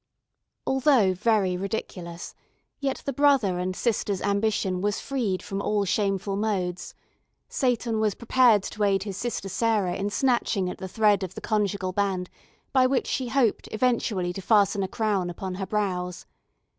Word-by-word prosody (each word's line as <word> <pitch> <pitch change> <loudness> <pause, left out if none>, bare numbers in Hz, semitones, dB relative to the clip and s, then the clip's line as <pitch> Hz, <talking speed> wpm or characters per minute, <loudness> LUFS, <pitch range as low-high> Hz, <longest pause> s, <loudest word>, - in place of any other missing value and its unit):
Although 265 -8 +3
very 200 -1 +1
ridiculous, 180 -3 -5 0.5
yet 275 -2 -2
the 275 - -2
brother 255 -10 +3
and 185 +1 -2
sister's 205 -4 0
ambition 200 -2 0
was 205 +1 0
freed 235 -9 -2
from 195 -1 -4
all 205 0 0
shameful 195 0 0
modes; 195 -4 -2 0.5
Seyton 240 -3 0
was 215 -2 +1
prepared 235 -3 +4
to 215 - -6
aid 195 -1 +2
his 200 -2 -5
sister 230 -2 -3
Sarah 205 -2 +1
in 200 +1 -2
snatching 205 -5 +1
at - - -10
the 190 - -5
thread 205 0 +3
of 190 -1 -5
the - - -5
conjugal 200 -3 -1
band 185 -2 -1 0.4
by 260 -1 +5
which 260 0 +1
she 260 - -2
hoped 240 -3 +1
eventually 215 -6 0
to 195 - -6
fasten 200 0 +3
a 190 - 0
crown 200 -3 -1
upon 185 +2 -5
her 190 - -3
brows. 180 -3 -2
200 Hz, 155 wpm, -26 LUFS, 185-225 Hz, 0.5 s, by